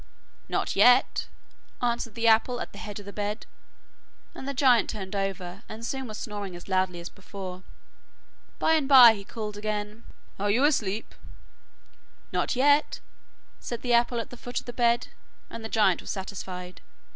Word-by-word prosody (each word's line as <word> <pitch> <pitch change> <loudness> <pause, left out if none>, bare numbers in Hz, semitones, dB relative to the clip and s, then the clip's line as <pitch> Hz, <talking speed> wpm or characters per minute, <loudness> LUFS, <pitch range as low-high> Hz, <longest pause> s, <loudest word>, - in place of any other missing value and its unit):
'Not - - -1
yet,' 250 +1 +5 0.5
answered 235 -2 -1
the 230 0 0
apple 230 +2 +4
at - - -5
the 200 - -11
head 210 -2 -7
of 205 - -11
the 200 - -9
bed, 210 +1 -3 0.9
and 265 - -8
the 280 - -2
giant 250 -3 +4
turned 195 -2 -5
over, 195 -1 -3
and 225 +1 -7
soon 265 +1 -3
was 215 -1 -7
snoring 205 -4 -6
as 175 - -11
loudly 185 -2 0
as 170 - -7
before. 185 -2 -8 1.0
By 320 - +3
and 305 -4 +2
bye 250 -5 +10
he 200 -2 -8
called 210 0 -6
again. 210 +1 -4 0.4
'Are 205 +1 0
you 235 +7 +3
asleep?' 225 -8 0 1.2
'Not - - 0
yet,' 285 +3 +3 0.6
said 240 -2 -6
the 245 -1 +1
apple 235 0 +3
at 230 - -6
the 245 - -9
foot 245 +1 -4
of - - -14
the 245 - -7
bed, 235 0 +2 0.4
and 230 - -7
the 220 - -5
giant 205 -6 +3
was - - -10
satisfied. 185 -2 -6
215 Hz, 170 wpm, -27 LUFS, 200-245 Hz, 1.2 s, bye